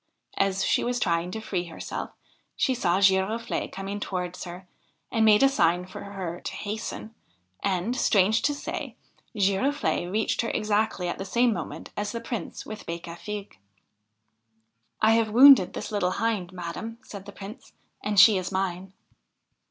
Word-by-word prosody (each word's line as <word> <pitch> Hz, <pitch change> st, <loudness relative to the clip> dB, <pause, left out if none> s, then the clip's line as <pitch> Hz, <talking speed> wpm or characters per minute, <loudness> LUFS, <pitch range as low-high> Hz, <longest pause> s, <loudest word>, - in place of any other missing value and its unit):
As 195 Hz, -1 st, +1 dB
she -, -, +2 dB
was 245 Hz, 0 st, -1 dB
trying 170 Hz, -2 st, 0 dB
to 220 Hz, -, -5 dB
free 190 Hz, -5 st, -3 dB
herself 165 Hz, -, -6 dB, 0.5 s
she 260 Hz, -, +2 dB
saw 190 Hz, -7 st, +1 dB
Giroflee 195 Hz, +4 st, +2 dB
coming 195 Hz, +1 st, -5 dB
towards 180 Hz, -3 st, -4 dB
her, 180 Hz, +1 st, -9 dB, 0.4 s
and 225 Hz, -, +2 dB
made 215 Hz, +2 st, +6 dB
a -, -, +8 dB
sign 180 Hz, -10 st, +2 dB
to 185 Hz, -, -9 dB
her 190 Hz, -4 st, -6 dB
to -, -, -4 dB
hasten; 220 Hz, +1 st, -5 dB, 0.5 s
and, 195 Hz, +5 st, 0 dB
strange 215 Hz, -2 st, +3 dB
to 290 Hz, -, +1 dB
say, 285 Hz, -, -5 dB, 0.4 s
Giroflde 200 Hz, -1 st, +1 dB
reached 215 Hz, +2 st, 0 dB
her 230 Hz, -, -2 dB
exactly 210 Hz, -3 st, 0 dB
at 175 Hz, -, -3 dB
the -, -, -3 dB
same 235 Hz, +4 st, +2 dB
moment 160 Hz, -4 st, -6 dB
as 205 Hz, 0 st, -3 dB
the 230 Hz, -, -3 dB
Prince 230 Hz, -5 st, -5 dB
with 215 Hz, -1 st, -8 dB
Becafigue. 170 Hz, -, -6 dB, 0.7 s
' 110 Hz, 0 st, -46 dB
I 220 Hz, -, +6 dB
have 225 Hz, -1 st, +3 dB
wounded 245 Hz, -4 st, +8 dB
this -, -, -5 dB
little 185 Hz, -3 st, 0 dB
Hind, 205 Hz, -4 st, -1 dB
madam,' 185 Hz, +6 st, -6 dB
said 200 Hz, -5 st, -10 dB
the -, -, -7 dB
Prince, 205 Hz, +6 st, -11 dB, 0.3 s
'and 205 Hz, -1 st, +2 dB
she 210 Hz, +1 st, +8 dB
is 185 Hz, +1 st, -5 dB
mine.' 190 Hz, 0 st, -2 dB
195 Hz, 160 wpm, -26 LUFS, 180-220 Hz, 0.7 s, a